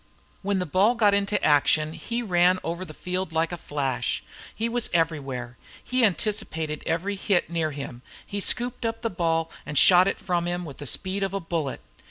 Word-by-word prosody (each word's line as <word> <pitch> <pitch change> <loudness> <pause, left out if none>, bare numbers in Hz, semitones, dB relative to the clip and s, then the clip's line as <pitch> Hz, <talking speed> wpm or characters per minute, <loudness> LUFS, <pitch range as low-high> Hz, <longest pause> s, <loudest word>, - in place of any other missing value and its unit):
When 200 0 0
the 180 - -1
ball 195 +9 +3
got 210 -4 +4
into 200 0 +1
action 155 +1 +3
he 235 +6 -3
ran 180 -2 +4
all 165 - -4
over 170 +2 -5
the 170 - -9
field 180 -1 -3
like 165 +1 0
a - - -2
flash. 135 -6 -2 0.3
He 225 +2 0
was 240 0 +1
everywhere. 135 -7 -1 0.2
He 255 0 +1
anticipated 170 -7 0
every 170 +5 -1
hit 190 -3 0
near 165 -2 0
him, 135 -4 -7 0.3
and 200 0 -2
scooped 245 +1 0
up 225 +1 -2
the 230 - 0
ball 165 -2 0
and 150 -1 -4
shot 180 +5 +7
it - - 0
from 175 -2 -1
him, 175 0 -2
with 140 -4 -9
the 145 - -7
speed 190 - 0
of 195 0 -1
a - - 0
bullet. 165 -6 -3
175 Hz, 200 wpm, -25 LUFS, 155-200 Hz, 0.3 s, shot